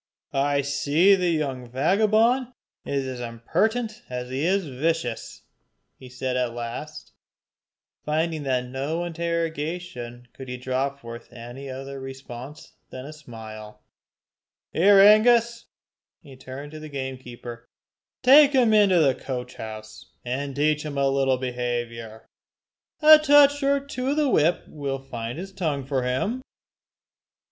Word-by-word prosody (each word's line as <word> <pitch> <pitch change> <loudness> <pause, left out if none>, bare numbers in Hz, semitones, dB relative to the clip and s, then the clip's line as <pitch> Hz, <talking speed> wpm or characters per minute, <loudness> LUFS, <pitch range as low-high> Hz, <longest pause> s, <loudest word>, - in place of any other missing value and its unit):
"I 140 +1 +1
see 145 +7 +3
the 180 -2 +2
young 135 -6 -2
vagabond 220 - +2 0.3
is 140 -1 -2
as 130 -1 -5
impertinent 220 - -1
as 125 0 -5
he 135 +3 -2
is 190 +2 +1
vicious," 140 -3 -3 0.6
he 130 - -12
said 125 0 -3
at 125 -2 -1
last, 120 +6 -7 0.9
finding 160 +1 -1
that 130 -3 0
to 125 - -9
no 140 +7 -3
interrogation 165 -7 -4
could 130 -2 -10
he 125 - -4
draw 130 +2 -1
forth 120 -4 -11
any 120 +3 -9
other 135 +1 -7
response 135 +2 -9 0.2
than 130 0 -8
a 150 - -8
smile. 110 -6 -11 0.9
"Here 195 +4 +6
Angus," 230 +3 +5 0.6
and 140 - -14
he - - -11
turned 130 +3 -9
to 155 - -9
the 155 0 -9
gamekeeper 125 -3 -7 0.5
"take 285 +3 +7
him 245 -5 +4
into 200 -4 +5
the 135 -4 +4
coach 125 -1 -6
house, 110 0 -9 0.2
and 135 +2 -3
teach 150 +1 +1
him 150 -2 -5
a 140 0 +2
little 135 -1 +2
behaviour. 120 -3 -4 0.8
A 310 0 +10
touch 290 -1 +5
or 280 0 +2
two 270 -2 -5
of 285 +2 0
the 300 -2 +2
whip 165 -4 +2
will 140 -2 -4
find 120 -2 -6
his 190 +3 -7
tongue 155 -8 -2
for 135 -1 -1
him." 130 - -1
140 Hz, 140 wpm, -24 LUFS, 125-180 Hz, 0.9 s, A